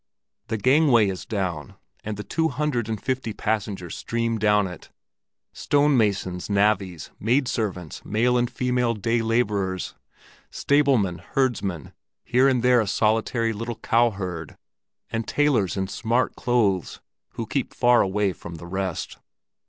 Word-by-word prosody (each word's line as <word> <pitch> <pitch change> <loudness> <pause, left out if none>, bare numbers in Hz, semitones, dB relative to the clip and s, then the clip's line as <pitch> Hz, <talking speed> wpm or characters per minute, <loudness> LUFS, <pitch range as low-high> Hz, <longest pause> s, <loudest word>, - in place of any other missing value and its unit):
The 110 - -2
gangway 130 -3 +4
is 95 -1 -6
down, 90 - -3 0.3
and 105 -1 -4
the 105 - -5
two 160 +7 0
hundred 130 -5 -1
and 110 -2 -2
fifty 130 -3 -2
passengers 105 -5 -3
stream 115 -1 -2
down 105 -1 +3
it—stone 145 - -3
masons, 100 -5 0
navvies, 100 -4 +1
maid 125 +5 +2
servants, 95 - -3
male 115 +4 +1
and 120 -1 +1
female 125 -2 0
day 115 +3 0
laborers, 105 -5 0 0.6
stablemen, 135 -11 +2
herdsmen, 100 - -2 0.3
here 130 +3 +3
and 125 -3 +2
there 125 -1 +5
a 110 - -2
solitary 115 +2 +1
little 115 +2 -4
cowherd, 95 -9 -1 0.5
and 115 -1 -2
tailors 125 - +1
in 95 0 -1
smart 115 +5 0
clothes, 105 -8 0 0.3
who 115 - -4
keep 130 +3 -2
far 120 -1 +4
away 100 0 0
from 85 -1 -9
the 85 - -10
rest. 95 0 -4
110 Hz, 135 wpm, -24 LUFS, 95-125 Hz, 0.6 s, there